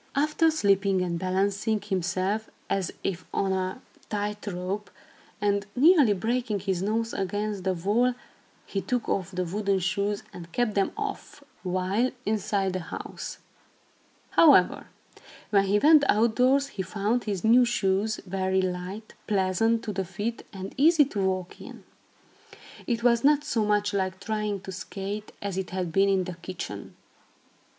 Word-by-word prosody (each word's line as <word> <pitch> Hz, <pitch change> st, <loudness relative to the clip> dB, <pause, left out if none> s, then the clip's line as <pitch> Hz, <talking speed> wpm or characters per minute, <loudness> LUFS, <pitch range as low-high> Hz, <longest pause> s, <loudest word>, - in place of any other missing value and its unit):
After 305 Hz, +3 st, +3 dB
slipping 200 Hz, -9 st, +2 dB
and 170 Hz, -2 st, -2 dB
balancing 200 Hz, +4 st, 0 dB
himself, 190 Hz, +2 st, -1 dB, 0.2 s
as 190 Hz, -3 st, 0 dB
if 185 Hz, -2 st, -2 dB
on 195 Hz, -1 st, 0 dB
a 185 Hz, +5 st, -3 dB, 0.3 s
tight 210 Hz, 0 st, -3 dB
rope, 190 Hz, +2 st, -4 dB, 0.5 s
and 200 Hz, 0 st, 0 dB
nearly 285 Hz, -, +6 dB
breaking 225 Hz, 0 st, -1 dB
his 190 Hz, -2 st, -1 dB
nose 225 Hz, +3 st, -1 dB
against 205 Hz, +1 st, -2 dB
the 190 Hz, -1 st, +1 dB
wall, 225 Hz, +8 st, +1 dB, 0.5 s
he 195 Hz, -, -3 dB
took 245 Hz, +2 st, -2 dB
off 185 Hz, -2 st, -1 dB
the 185 Hz, -1 st, -2 dB
wooden 200 Hz, +2 st, 0 dB
shoes, 200 Hz, +2 st, -1 dB
and 170 Hz, -1 st, -10 dB
kept 240 Hz, 0 st, 0 dB
them 195 Hz, -1 st, +1 dB
off, 415 Hz, -8 st, -5 dB, 0.2 s
while 185 Hz, +6 st, 0 dB, 0.2 s
inside 200 Hz, -2 st, 0 dB
the 185 Hz, -, -1 dB
house. 165 Hz, -, -7 dB, 0.9 s
However, 280 Hz, -, +5 dB, 0.6 s
when 200 Hz, -2 st, +4 dB
he 200 Hz, +2 st, +3 dB
went 300 Hz, +5 st, +6 dB
outdoors, 250 Hz, +5 st, +3 dB
he 210 Hz, -, -5 dB
found 205 Hz, +6 st, -1 dB
his 200 Hz, -4 st, -3 dB
new 235 Hz, +3 st, +6 dB
shoes 215 Hz, -2 st, 0 dB
very 190 Hz, 0 st, 0 dB
light, 185 Hz, +4 st, -5 dB
pleasant 215 Hz, +3 st, +1 dB
to 210 Hz, -, -4 dB
the 190 Hz, 0 st, -1 dB
feet 205 Hz, +6 st, -4 dB
and 190 Hz, -1 st, -7 dB
easy 305 Hz, +2 st, +6 dB
to 205 Hz, -7 st, -3 dB
walk 185 Hz, -1 st, -2 dB
in. -, -, -11 dB, 1.0 s
It 235 Hz, -2 st, -1 dB
was 235 Hz, -1 st, +4 dB
not 295 Hz, +1 st, +4 dB
so 245 Hz, -8 st, 0 dB
much 205 Hz, 0 st, +1 dB
like 190 Hz, -1 st, -1 dB
trying 210 Hz, -1 st, -2 dB
to 190 Hz, -, -8 dB
skate, 200 Hz, +2 st, -6 dB
as 195 Hz, -2 st, -2 dB
it 190 Hz, -, -4 dB
had 185 Hz, -2 st, -3 dB
been 195 Hz, +3 st, +3 dB
in 190 Hz, -1 st, +2 dB
the 180 Hz, -2 st, -7 dB
kitchen. 170 Hz, -, -7 dB
200 Hz, 150 wpm, -27 LUFS, 190-225 Hz, 1.0 s, nearly